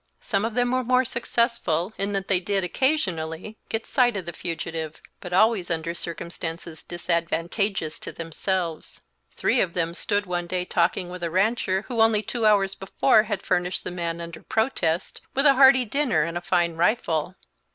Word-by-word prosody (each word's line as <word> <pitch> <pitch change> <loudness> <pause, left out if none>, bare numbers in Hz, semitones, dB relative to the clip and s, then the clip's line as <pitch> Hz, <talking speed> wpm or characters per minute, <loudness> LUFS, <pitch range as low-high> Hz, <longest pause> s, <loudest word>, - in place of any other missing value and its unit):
Some 205 -2 -1
of 225 -1 -3
them 245 0 +2
were 255 0 +1
more 255 +1 +3
successful, 235 -7 0
in 200 +1 -1
that 195 -1 -2
they 190 -2 +4
did, 195 +1 -1
occasionally, 185 - -1
get 225 0 -2
sight 245 -5 +2
of 185 - -4
the 170 - -5
fugitive, 165 -2 -5 0.2
but 180 - -8
always 200 0 +3
under 165 0 -2
circumstances 170 -1 -6
disadvantageous 170 +1 -1
to - - -7
themselves. 165 0 -3 0.3
Three 255 - +2
of 175 -3 -1
them 170 -1 -1
stood 205 +3 -1
one 175 -1 -2
day 180 0 -2
talking 180 +1 0
with 180 0 -7
a 170 - -1
rancher, 190 +1 +1
who 235 -3 0
only 220 -1 +4
two 230 -1 0
hours 195 -2 +3
before 215 +4 +3
had 205 -3 -2
furnished 180 +1 0
the - - -4
man, 170 -1 -3
under 170 -1 -8
protest, 180 -8 -1
with 275 +2 +3
a 280 - +8
hearty 265 -1 +6
dinner 240 - +1
and 170 +1 -4
a 175 - -2
fine 175 -2 +1
rifle. 170 -3 +1
185 Hz, 175 wpm, -25 LUFS, 170-225 Hz, 0.3 s, a